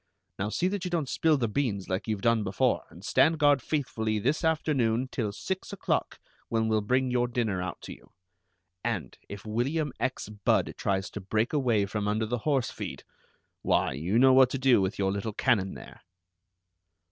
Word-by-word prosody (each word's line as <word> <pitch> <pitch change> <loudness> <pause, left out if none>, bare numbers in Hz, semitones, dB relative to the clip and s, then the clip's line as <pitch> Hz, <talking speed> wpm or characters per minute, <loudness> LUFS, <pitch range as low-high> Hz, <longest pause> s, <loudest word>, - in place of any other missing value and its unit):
Now 100 +2 -1
see 175 +11 0
that 195 0 -2
you 180 - -2
don't 165 -5 -1
spill 155 +3 +2
the 120 -4 0
beans, 105 -5 -1
like 95 +4 -2
you've 105 -3 -2
done 115 -2 +3
before, 95 -1 0
and - - -13
stand 160 +1 +3
guard 145 -3 +4
faithfully 110 -7 -1
this 140 - 0
afternoon 135 -7 +1
till 110 -5 -2
six 190 - -5
o'clock, 200 - -2 0.3
when 110 -1 +1
we'll 110 -1 +2
bring 130 +4 +1
your 125 0 +2
dinner 115 -6 -1
out 90 -2 -5
to - - -8
you, - - -18 0.7
and 100 - -3
if 100 +1 -8
William 135 +7 -1
X. 130 -4 -2
Budd 105 -1 0
tries 95 0 -1
to 105 - -6
break 110 +7 -1
away 120 -8 +2
from 105 +1 -3
under 110 +1 0
the 120 +2 -2
horse 135 -5 +1
feed, - - -7 0.6
why, - - +2
you 85 - -1
know 130 +1 +6
what 130 -1 +6
to 135 - -2
do 130 -5 +4
with 95 +1 -1
your 95 -1 +1
little 100 +2 -3
cannon 95 -3 +1
there!" - - -12
115 Hz, 190 wpm, -28 LUFS, 105-135 Hz, 0.7 s, know